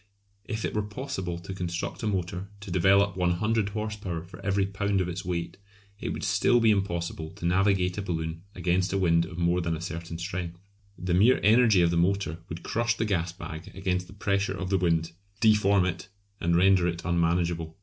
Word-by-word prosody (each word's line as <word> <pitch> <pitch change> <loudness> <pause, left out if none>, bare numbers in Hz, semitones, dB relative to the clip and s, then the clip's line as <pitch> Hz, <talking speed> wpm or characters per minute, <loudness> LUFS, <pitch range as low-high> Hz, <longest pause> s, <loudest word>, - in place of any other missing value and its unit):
If 110 -1 -3
it - - -3
were 105 - +1
possible 105 -5 -4
to 85 +3 -7
construct 85 -2 -4
a 110 - -1
motor 90 -1 -2
to 100 -2 -8
develop 95 +2 +4
100 100 +4 +1
horse 105 +1 -3
power 90 -6 -5
for 90 +2 -13
every 100 0 +1
pound 100 0 -1
of 90 - 0
its 90 +1 -4
weight, 85 -2 -3 0.4
it - - -4
would - - -4
still 120 - +3
be 115 -2 +5
impossible 85 -5 -2
to - - -7
navigate 90 +1 +2
a - - -1
balloon 80 -3 -3
against 90 +1 0
a - - +2
wind 85 -3 +3
of 90 -1 -9
more 85 +1 +2
than 85 -1 -1
a - - -9
certain 85 -1 -5
strength. 85 -1 -5 0.4
The 90 -1 -2
mere 110 +8 +5
energy 110 -4 +5
of 85 - +3
the 85 - +1
motor 90 -2 +1
would 80 +1 -7
crush 120 +1 0
the 115 - 0
gas 85 -5 0
bag 85 -3 -8
against 90 -1 -1
the - - -13
pressure 100 0 -1
of 95 0 -4
the 95 - +3
wind, 85 -2 +1 0.3
deform 105 -4 +4
it, 90 +2 -4 0.3
and 85 0 +1
render 95 0 +5
it 85 -1 -4
unmanageable. 85 -1 0
90 Hz, 200 wpm, -27 LUFS, 85-100 Hz, 0.4 s, be